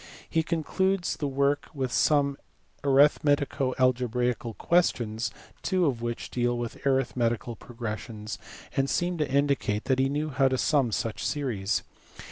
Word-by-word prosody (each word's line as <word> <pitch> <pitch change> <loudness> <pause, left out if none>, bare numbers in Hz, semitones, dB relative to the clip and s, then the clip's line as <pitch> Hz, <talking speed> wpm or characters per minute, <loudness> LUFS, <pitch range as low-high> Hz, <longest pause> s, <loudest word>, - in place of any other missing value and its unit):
He 160 - +1
concludes 175 +3 0
the 145 - -1
work 140 +1 +1
with 130 -3 -2
some 140 -1 +3 0.5
arithmetico 145 -1 +3
algebraical 125 -2 +1
questions, 120 -10 +1 0.3
two 185 -2 +1
of 125 -6 0
which 120 0 -4
deal 120 0 0
with 120 -1 -5
arithmetical 120 -3 0
progressions 110 -2 -6 0.4
and 135 0 +1
seem 175 +4 0
to 150 - 0
indicate 140 -7 +1
that 130 0 +1
he 135 0 +3
knew 150 +2 -1
how 135 0 +3
to 130 0 +1
sum 135 -4 +2
such 115 0 -2
series. 115 -8 -1
130 Hz, 135 wpm, -27 LUFS, 120-145 Hz, 0.5 s, some